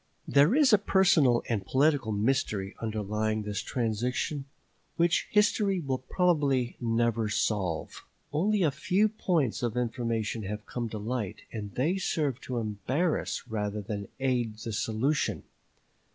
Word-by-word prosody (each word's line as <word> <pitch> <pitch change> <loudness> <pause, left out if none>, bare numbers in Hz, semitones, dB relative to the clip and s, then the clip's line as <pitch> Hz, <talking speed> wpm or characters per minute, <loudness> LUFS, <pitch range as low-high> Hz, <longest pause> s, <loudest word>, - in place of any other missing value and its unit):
There 145 - +5
is 285 -6 +5
a 210 - +7
personal 175 - +4
and 110 -5 -1
political 135 +2 +2
mystery 105 -3 0
underlying 110 0 -1
this 105 -1 -3
transaction 125 +5 -2 0.5
which 170 0 +2
history 205 -2 +2
will 135 -5 -2
probably 140 -6 +1
never 115 -1 +1
solve. 100 -6 -1 0.3
Only 195 +6 +2
a 155 - +3
few 185 +9 +2
points 175 - 0
of 120 -1 -1
information 115 -2 -1
have 105 +1 -5
come 120 -2 -4
to 110 - -5
light, 110 -1 -4
and 105 -3 -6
they 160 +9 +1
serve 150 -8 -1
to 125 - -4
embarrass 125 - -1
rather 105 -2 -2
than 100 -1 -5
aid 120 -5 0
the 110 0 -5
solution. 115 +8 0
120 Hz, 135 wpm, -29 LUFS, 110-150 Hz, 0.5 s, a